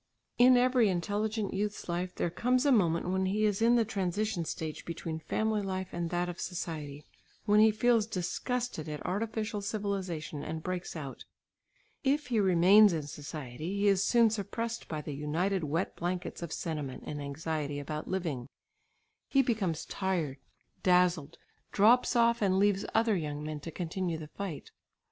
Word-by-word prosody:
In 250 +1 +7
every 250 -3 +4
intelligent 205 +4 -1
youth's 205 +2 -3
life 180 +1 -2
there 170 - -1
comes 250 - +1
a 285 - +5
moment 175 -7 +2
when 190 0 +1
he 210 +3 +1
is 205 0 +1
in 235 +1 +5
the 230 -2 +3
transition 200 -2 -1
stage 155 -1 -5
between 165 -1 -5
family 215 +6 0
life 190 -1 -3
and 170 -1 -3
that 175 +1 0
of 175 -1 -6
society, 150 -5 -5 0.4
when 210 0 +5
he 220 +1 +7
feels 220 0 +2
disgusted 220 - -3
at 150 -1 -6
artificial 215 +1 -2
civilisation 195 -8 -3
and 160 0 -5
breaks 180 -1 -4
out. 140 -4 -7 0.8
If 280 0 +1
he 230 -3 +2
remains 190 +2 +6
in 160 -2 -2
society, 145 +3 -6
he 205 +1 +2
is 195 -1 +4
soon 235 -2 +4
suppressed 225 +2 -3
by 155 -2 -4
the 150 - -5
united 165 +6 -1
wet 160 +6 -1
blankets 180 +1 -3
of 170 -2 -5
sentiment 150 -7 -4
and 145 -1 -5
anxiety 145 0 -3
about 150 +2 -5
living; 160 -10 -2 0.8
he 275 -1 +3
becomes 200 -10 -1
tired, 170 -8 -2 0.4
dazzled, 180 -4 +2 0.3
drops 240 +5 +4
off 235 -1 +4
and 190 -2 +3
leaves 200 0 +2
other 225 -1 +3
young 150 -4 -3
men 155 0 -4
to 155 - -7
continue 175 0 -3
the 155 -1 -8
fight. 190 -3 -6
185 Hz, 160 wpm, -31 LUFS, 160-215 Hz, 0.8 s, In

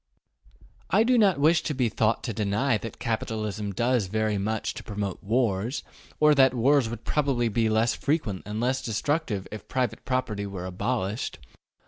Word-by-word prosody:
I 220 - +4
do 250 +2 +3
not 200 -9 +4
wish 160 +3 +4
to 150 - -3
be 125 -2 +2
thought 110 0 +1
to 115 - -3
deny 105 +4 +1
that 115 0 -7
capitalism 110 -2 -3
does 120 +1 +1
very 110 0 0
much 110 +2 -2
to - - -8
promote 100 -3 -4
wars, 115 +2 0 0.4
or 150 0 +6
that 130 -2 +5
wars 130 0 +3
would 115 -1 -7
probably 135 -6 +1
be 110 +1 +1
less 110 +2 +2
frequent 140 - -1
and 105 +1 -3
less 130 +2 0
destructive 115 - -1
if 110 - -8
private 125 -4 -1
property 115 -6 -2
were 95 -2 -6
abolished. 100 +3 -2
115 Hz, 165 wpm, -26 LUFS, 105-130 Hz, 0.4 s, or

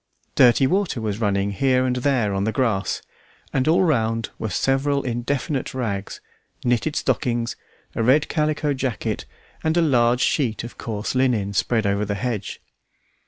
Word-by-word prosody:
Dirty 125 +2 +5
water 185 -3 0
was 110 0 -3
running 100 -1 +1
here 130 +4 +2
and 125 -1 0
there 125 -6 +1
on 95 0 0
the 110 - 0
grass, 110 -6 0 0.5
and 130 +1 +1
all 170 +4 +4
round 115 - 0
were 110 - -2
several 135 +7 +1
indefinite 130 +3 -2
rags, 105 -6 -3 0.4
knitted 125 +5 +1
stockings, 120 -3 0 0.4
a - - -2
red 135 +6 +4
calico 150 -1 0
jacket, 130 -4 -3 0.4
and 160 +1 +1
a - - +5
large 125 -4 +3
sheet 120 -9 +1
of 120 - -8
coarse 110 -2 -3
linen 120 -6 +1
spread 110 +3 +1
over 100 +1 +1
the 100 0 -2
hedge. 110 -3 -4
125 Hz, 155 wpm, -23 LUFS, 110-135 Hz, 0.5 s, Dirty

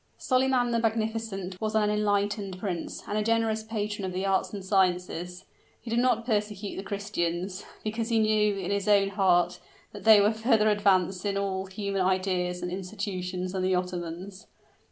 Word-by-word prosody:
Solyman 255 -2 +2
the 230 - +2
Magnificent, 220 -4 -2
was 215 0 -1
an 210 -1 +3
enlightened 205 -2 0
prince, 185 -3 -4
and 210 - -1
a - - +1
generous 225 0 +1
patron 210 -2 -3
of 185 -1 -3
the 185 +2 -2
arts 195 -1 +1
and 200 -3 -7
sciences. 180 -2 0 0.3
He 230 - -8
did 230 - +2
not 240 -2 +2
persecute 210 -3 -2
the - - -4
Christians, 195 -2 -3 0.2
because 220 +2 -2
he 230 - +2
knew, 215 -1 +3
in 195 - -3
his 200 0 -1
own 200 -1 +4
heart, 180 -3 +2 0.3
that 205 -2 -9
they 220 -2 +8
were 205 +2 +4
further 220 -1 +3
advanced 190 -3 +2
in 200 -1 -1
all 195 -1 -2
human 195 0 -2
ideas 185 -1 0
and 180 - -3
institutions 185 -1 -4
than 190 0 -2
the 185 0 +2
Ottomans. 180 +1 -5
200 Hz, 175 wpm, -28 LUFS, 185-215 Hz, 0.3 s, they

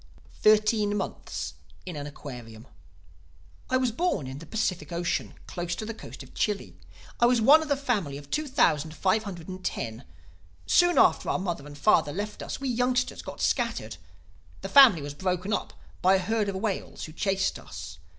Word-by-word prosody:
THIRTEEN 215 -1 +4
MONTHS 195 - -4 0.3
IN 180 -3 -6
AN 145 0 -5
AQUARIUM 120 -6 -9 1.0
"I 255 - +3
was 255 -2 +1
born 235 - 0
in 130 +2 -7
the 165 - -11
Pacific 185 -2 -2
Ocean, 170 0 -2
close 175 -1 -4
to 215 - -5
the 230 - -4
coast - - -10
of - - -16
Chile. 200 - -2 0.4
I 240 - +6
was 245 -1 +3
one 285 +8 +7
of 315 - -5
a 285 - +2
family 210 - -1
of 145 0 -12
two 305 0 -1
thousand 160 - +2
five 215 +7 +1
hundred 175 -5 -7
and 185 0 -7
ten. 115 -4 -4 0.6
Soon 350 0 +4
after - - +4
our - - +1
mother 175 -6 -4
and 145 0 -10
father 145 - +3
left 205 +3 -4
us, - - -5
we 275 - -3
youngsters 250 +1 0
got - - -8
scattered. 230 - -1 0.6
The - - -5
family 240 - +8
was 145 0 -5
broken 185 +4 -2
up—by 190 -2 0
a - - +4
herd 210 +2 0
of 195 - -3
whales 195 0 -3
who 155 - -7
chased 195 +2 0
us. 75 -1 -9
190 Hz, 180 wpm, -27 LUFS, 150-225 Hz, 1.0 s, family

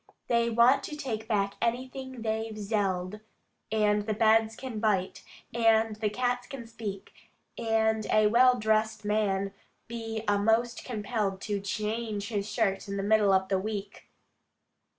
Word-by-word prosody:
They 235 -1 +3
want 235 +4 +5
take 245 -8 -5
back 200 -3 0
anything 255 +1 -3
they've 220 0 -2
zelled, 200 -2 -2 0.5
And 210 -1 +2
the 215 - 0
beds 220 0 +3
can 250 -4 -6
bite, 205 -4 0 0.3
and 225 -1 +3
the 215 -1 0
cats 245 +2 -1
can 275 -5 -8
speak: 215 -4 -7 0.4
And 220 -1 +1
a 215 0 +4
well 250 +4 +5
dress'd 220 -1 0
man 200 -2 0 0.3
be 225 -1 -5
a 205 0 +3
most 225 +3 +1
compelled 210 -4 -2
To 205 -2 -2
channge 210 +1 -3
his 210 -2 -3
shirt 200 -5 0
in 200 0 -4
the 195 - -2
middle 210 -1 +4
of 190 0 +2
the 190 -1 +2
week! 205 0 -6
220 Hz, 145 wpm, -29 LUFS, 205-230 Hz, 0.5 s, want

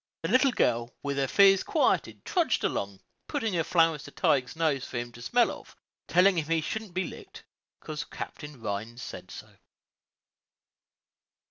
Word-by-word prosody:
The - - -1
little 260 +1 +5
girl, 120 - +1
with 140 -1 -2
her 135 -1 +1
fears 195 +4 +6
quieted, 315 - 0
trudged 335 - +1
along, 100 -1 -2 0.3
putting 225 -9 -2
her 165 -2 +1
flowers 165 -3 +2
to - - -10
Tige's 125 -2 +1
nose 155 -5 +1
for 130 - -6
him 120 0 -4
to 120 - -13
smell 240 - +2
of, - - -11 0.3
telling 185 +1 +4
him 155 - -3
he 165 0 +2
shouldn't 205 +3 -5
be 185 - +1
licked, - - -10 0.4
'cause 155 +1 -5
Captain 150 -4 -8
Rhines 115 +3 -5
said - - -8
so. - - -11
160 Hz, 160 wpm, -28 LUFS, 125-195 Hz, 0.4 s, fears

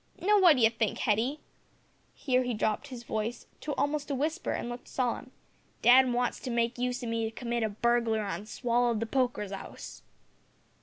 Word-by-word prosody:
Now, 415 +3 +4
what 345 -5 +7
d'ye 235 -4 +5
think, 225 -2 -1
Hetty," 235 +8 0 0.7
(here 255 -3 +1
he 245 -2 -2
dropped 215 +6 -1
his 250 -4 -8
voice 220 +1 -3
to 295 - -4
almost 290 +1 -1
a 280 - 0
whisper 310 +6 -1
and - - -3
looked 240 +1 -7
solemn), 250 0 -2 0.5
"dad 255 +1 +7
wants 245 0 0
to 260 - -6
make 235 0 0
use 250 0 -1
o' - - -3
me 230 0 -1
to - - -2
commit 235 -1 -2
a 220 - +1
burglary 230 +1 +1
on 200 +1 -5
Swallow'd 240 -1 +1
the 230 - -1
poker's 245 -5 -1
'ouse." 195 - -8
240 Hz, 185 wpm, -29 LUFS, 230-260 Hz, 0.7 s, what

